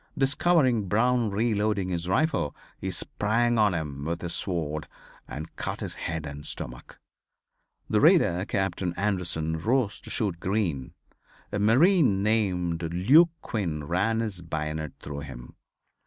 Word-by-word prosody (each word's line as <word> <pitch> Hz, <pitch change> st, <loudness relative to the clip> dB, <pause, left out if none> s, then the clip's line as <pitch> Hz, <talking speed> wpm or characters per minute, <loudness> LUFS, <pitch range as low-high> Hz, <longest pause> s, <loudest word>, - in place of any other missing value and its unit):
Discovering 135 Hz, -, +3 dB
Brown 120 Hz, +3 st, +2 dB
reloading 105 Hz, -2 st, 0 dB
his 85 Hz, -1 st, -2 dB
rifle 155 Hz, -, +1 dB, 0.2 s
he -, -, -3 dB
sprang 115 Hz, +3 st, 0 dB
on 105 Hz, -4 st, +4 dB
him 75 Hz, -4 st, -4 dB
with 85 Hz, +1 st, -2 dB
his 85 Hz, -1 st, -2 dB
sword 80 Hz, -4 st, -2 dB, 0.4 s
and 80 Hz, +3 st, -7 dB
cut -, -, -4 dB
his -, -, -4 dB
head 80 Hz, -2 st, -4 dB
and 70 Hz, 0 st, -7 dB
stomach. 60 Hz, -4 st, -6 dB, 0.9 s
The -, -, +2 dB
raider 90 Hz, +2 st, +5 dB
Captain 95 Hz, -2 st, -1 dB
Anderson 85 Hz, -5 st, 0 dB
rose 115 Hz, +3 st, 0 dB
to -, -, -9 dB
shoot 95 Hz, -6 st, -1 dB
Green. 90 Hz, -10 st, -2 dB, 0.6 s
A 105 Hz, -, -1 dB
marine 125 Hz, -, +4 dB
named 90 Hz, -6 st, +1 dB
Luke 135 Hz, -, +6 dB
Quinn 85 Hz, -9 st, -2 dB
ran 100 Hz, +9 st, +1 dB
his 105 Hz, -6 st, -4 dB
bayonet 80 Hz, -2 st, -4 dB
through 70 Hz, -1 st, -6 dB
him. 65 Hz, -4 st, -9 dB
95 Hz, 135 wpm, -27 LUFS, 80-110 Hz, 0.9 s, Luke